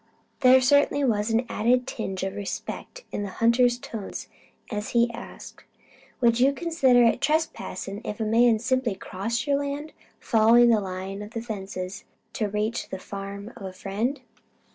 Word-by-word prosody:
There 260 -1 +7
certainly 285 +2 +3
was 215 -4 +1
an 230 +2 +1
added 245 +3 +2
tinge 195 -7 -4
of 190 - -2
respect 205 - -6
in - - -3
the 200 - -3
hunter's 240 +1 +4
tones 225 -4 -7 0.4
as 210 -1 -3
he 235 0 +4
asked: 230 - -10 0.6
"Would 235 -1 +4
you 270 +3 +4
consider 275 -7 +3
it 235 +2 +3
trespass 310 -4 -1
if 205 +2 -6
a - - 0
man 230 +1 +4
simply 255 -2 0
crossed 205 +6 -3
your 285 -1 +2
land, 285 +2 -4 0.3
following 235 +1 +5
the 220 -2 +4
line 190 +1 -5
of 210 +2 -9
the 230 - -2
fences 195 -3 -6 0.3
to 210 -2 -1
reach 210 +3 -2
the 190 - -4
farm 200 +3 -7
of 240 - -13
a 190 -1 -6
friend?" 215 +9 -3
230 Hz, 165 wpm, -26 LUFS, 205-250 Hz, 0.6 s, There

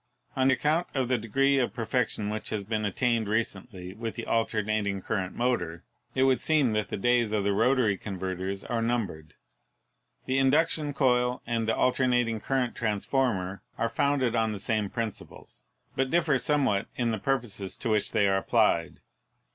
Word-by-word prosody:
On 130 -1 +3
account 150 +6 +1
of 130 -3 0
the 125 -2 +2
degree 135 +5 +2
of 125 - -1
perfection 115 -3 -1
which 110 0 -4
has 105 -2 -2
been 110 +1 -2
attained 115 +2 0
recently 100 -3 -3
with 115 +2 -5
the 115 - -5
al 115 -1 +1
ternating 105 -3 -1
current 95 -4 -2
motor, 85 -9 -1 0.3
it 130 - +3
would 135 -1 +3
seem 150 -7 +2
that 105 -1 -1
the - - -3
days 120 0 +2
of 105 -2 0
the 100 0 +1
rotary 115 -2 +2
converters 95 0 -4
are 115 -1 -2
numbered. 100 -10 -2 0.9
The 130 +1 +1
induction 145 +1 +2
coil 125 -2 +2
and 115 -1 -1
the 110 - +2
alternating 125 -3 +2
current 130 0 -1
trans 105 -3 -2
former 100 -9 0 0.2
are - - 0
founded 140 -4 +1
on 110 -1 +1
the 100 - -6
same 105 -1 -1
principles, 115 -2 -7 0.3
but 135 0 0
differ 155 -4 +2
somewhat 135 -10 +1
in 120 -2 0
the 110 - -2
purposes 115 -7 -2
to 120 - -2
which 105 -2 +2
they 105 -3 +3
are 95 0 +2
applied. 95 - +1
115 Hz, 170 wpm, -28 LUFS, 105-130 Hz, 0.9 s, On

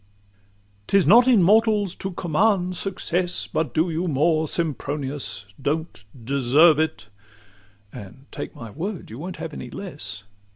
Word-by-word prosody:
XVIII 100 0 -36
"'T 200 - +4
is 195 - +3
not 235 - +7
in 230 -8 +5
mortals 210 -1 +3
to 190 - -5
command 180 +1 +1
success: 180 -1 -2
But 160 - -2
do 165 +2 +1
you 165 +3 -2
more, 155 +1 +2
Sempronius 140 - -3 0.2
don't 155 -4 -3 0.2
deserve 140 +5 +4
it," 155 -9 -2 0.8
And 105 +7 -11
take - - -7
my 115 -2 -9
word, 175 - -6
you 115 - -8
won't 180 +3 -6
have 160 -2 -6
any - - -7
less. 140 - -7
155 Hz, 150 wpm, -23 LUFS, 120-180 Hz, 0.8 s, not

